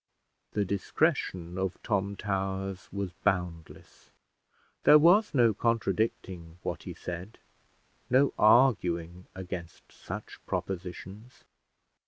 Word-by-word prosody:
The 105 -1 +1
discretion 95 - -1
of 95 -1 -2
Tom 100 -2 -1
Towers 95 -1 -3
was 100 -2 -3
boundless: 90 -5 -3 0.7
there 150 - +9
was 180 +8 +5
no 120 -4 +5
contradicting 95 -6 -1
what - - -3
he - - -8
said, 90 +5 -7 0.7
no 135 +3 +4
arguing 90 -7 +3
against 90 -2 -8
such - - -8
propositions. 95 +5 -6
95 Hz, 95 wpm, -29 LUFS, 90-110 Hz, 0.7 s, there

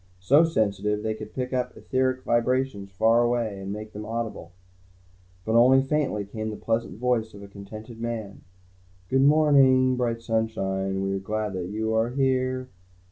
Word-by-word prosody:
So 135 - +4
sensitive, 105 - 0
they 110 - -1
could 110 0 -9
pick 125 0 -3
up 125 -1 -2
etheric 130 0 -1
vibrations 120 -3 0
far 110 +5 +3
away 120 -4 0
and 95 0 -5
make 105 +1 -7
them 105 - -6
audible. 115 -1 -5 0.9
But 110 - -1
only 130 +3 +6
faintly, 135 -8 -1
came 110 +2 -5
the 105 - -5
pleasant 115 0 -2
voice 115 -3 -1
of 100 - -11
a - - -9
contented 110 +3 -10
man: 115 -4 -5 0.7
"Good 135 0 +3
morning, 135 -3 +5
bright 115 -2 -1
sunshine, 95 -4 -1
We're 95 0 -1
glad 105 +1 -3
you 105 +5 -3
are 110 +1 +2
here. 130 -1 0
115 Hz, 155 wpm, -25 LUFS, 105-130 Hz, 0.9 s, only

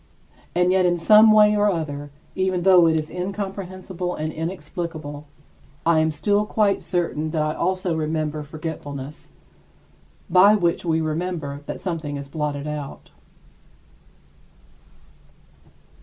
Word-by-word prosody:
And 180 +1 +3
yet 190 0 +3
in 175 -1 +2
some 215 +5 +7
way 210 0 +6
or 210 0 +3
other, 145 -5 -3 0.3
even 185 -2 0
though 180 -3 +6
it 160 - +3
is 155 -1 -2
incomprehensible 185 -1 -5
and 155 0 -4
inexplicable, 160 -3 -6 0.6
I 165 -1 +4
am 160 0 +2
still 205 +7 +1
quite 210 -2 +1
certain 170 -3 -2
that 155 -1 0
I 155 0 -1
also 185 0 -1
remember 155 -1 -2
forgetfulness, 150 -2 -7 1.0
by 190 +4 +6
which 170 -4 0
we 160 -2 +1
remember 155 -3 -3
that - - -5
something 160 -6 -3
is 140 0 -8
blotted 150 -2 -3
out. 150 -2 -6
170 Hz, 125 wpm, -23 LUFS, 155-185 Hz, 1.0 s, some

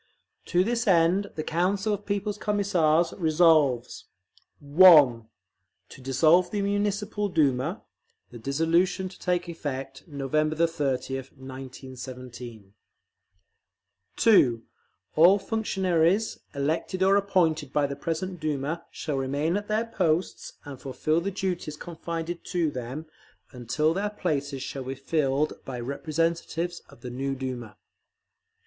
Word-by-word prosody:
To 180 +1 +2
this 230 +2 -1
end 180 +2 +4
the 155 - -3
Council 190 +6 0
of 205 0 -5
People's 205 0 -2
Commissars 175 -6 +2
resolves: 155 -7 +3 0.5
(1) 145 -7 +6 0.6
To - - -13
dissolve 155 +7 +4
the 205 0 -2
Municipal 205 +1 -1
Duma; 155 - +1 0.5
the 120 - -10
dissolution 165 - +1
to 185 - -15
take 180 -1 -1
effect 135 -5 -6
November 155 +1 -1
30th, 135 -5 -1
1917. 130 -4 -9 1.4
(2) 125 - +4 0.5
All 175 +6 +7
functionaries 195 -2 0 0.2
elected 160 +6 -1
or 195 +1 +5
appointed 165 -8 +1
by 145 0 +2
the 140 0 -4
present 165 +5 -4
Duma 155 +1 -2
shall 150 -3 -4
remain 140 +6 0
at 205 0 -3
their 215 +2 0
posts 180 -6 -1
and 140 -3 -9
fulfil 155 +4 0
the 195 - -2
duties 180 -6 -3
confided 170 0 -5
to 170 -4 0
them, 130 +4 -6 0.5
until 130 +6 0
their 200 +3 -1
places 145 -9 -2
shall 135 -1 -6
be 135 +1 -4
filled 140 +1 -1
by 125 -2 -6
representatives 165 +5 -2
of - - -17
the 125 - -7
new 135 +2 -2
Duma. 125 -4 -6
160 Hz, 120 wpm, -26 LUFS, 135-185 Hz, 1.4 s, All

